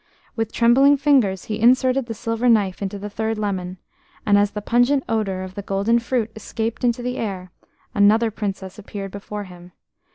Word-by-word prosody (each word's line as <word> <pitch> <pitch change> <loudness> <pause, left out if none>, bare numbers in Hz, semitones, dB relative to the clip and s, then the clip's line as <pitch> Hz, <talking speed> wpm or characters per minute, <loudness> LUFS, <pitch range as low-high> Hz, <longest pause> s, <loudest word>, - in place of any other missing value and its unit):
With 225 -2 -2
trembling 270 +5 +5
fingers 255 -10 +2
he 215 0 -4
inserted 255 +2 +3
the 225 - -5
silver 230 +2 -1
knife 205 -5 +2
into 200 0 -3
the 200 +1 -6
third 220 +1 -3
lemon, 190 -3 -3 0.5
and 205 - +4
as 205 0 +3
the 210 - -5
pungent 245 +4 +2
odour 195 -4 -1
of 185 0 -8
the 200 - -6
golden 200 +4 +1
fruit 230 -2 -2
escaped 225 +2 -4
into 240 0 +1
the 250 +1 -3
air 185 -4 -4 0.4
another 220 +2 +4
Princess 195 -2 -5
appeared 200 -1 -7
before 205 +1 -6
him. 180 -2 -14
215 Hz, 175 wpm, -21 LUFS, 195-235 Hz, 0.5 s, trembling